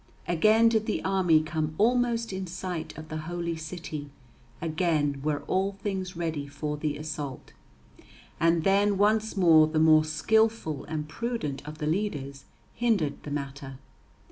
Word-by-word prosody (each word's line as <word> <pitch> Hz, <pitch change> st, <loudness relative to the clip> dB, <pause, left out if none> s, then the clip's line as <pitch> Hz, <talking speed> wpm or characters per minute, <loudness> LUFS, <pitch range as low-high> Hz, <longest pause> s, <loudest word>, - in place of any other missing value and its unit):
Again 215 Hz, +7 st, +4 dB
did 220 Hz, -1 st, +1 dB
the 215 Hz, -, -1 dB
army 180 Hz, -5 st, +3 dB
come 155 Hz, -1 st, -2 dB
almost 235 Hz, -1 st, +2 dB
in 190 Hz, 0 st, -4 dB
sight 180 Hz, -1 st, -5 dB
of 155 Hz, 0 st, -9 dB
the 155 Hz, -, -4 dB
Holy 170 Hz, -1 st, -2 dB
City; 160 Hz, -2 st, -6 dB, 0.5 s
again 155 Hz, -4 st, 0 dB
were 145 Hz, -1 st, -1 dB
all 190 Hz, +5 st, 0 dB
things 190 Hz, -2 st, -4 dB
ready 160 Hz, -4 st, -3 dB
for 150 Hz, +1 st, -4 dB
the 150 Hz, -1 st, -2 dB
assault. 150 Hz, -3 st, -6 dB, 0.9 s
And 165 Hz, 0 st, +3 dB
then 200 Hz, +1 st, +3 dB
once 215 Hz, +1 st, +2 dB
more 160 Hz, -4 st, +6 dB
the 155 Hz, 0 st, -2 dB
more 155 Hz, 0 st, +6 dB
skilful 160 Hz, 0 st, +1 dB
and 150 Hz, 0 st, -4 dB
prudent 225 Hz, -, -4 dB
of 155 Hz, 0 st, -7 dB
the 155 Hz, -, -4 dB
leaders 150 Hz, -6 st, -2 dB, 0.3 s
hindered 210 Hz, -12 st, 0 dB
the -, -, -8 dB
matter. 140 Hz, -2 st, -5 dB
165 Hz, 145 wpm, -27 LUFS, 150-195 Hz, 0.9 s, more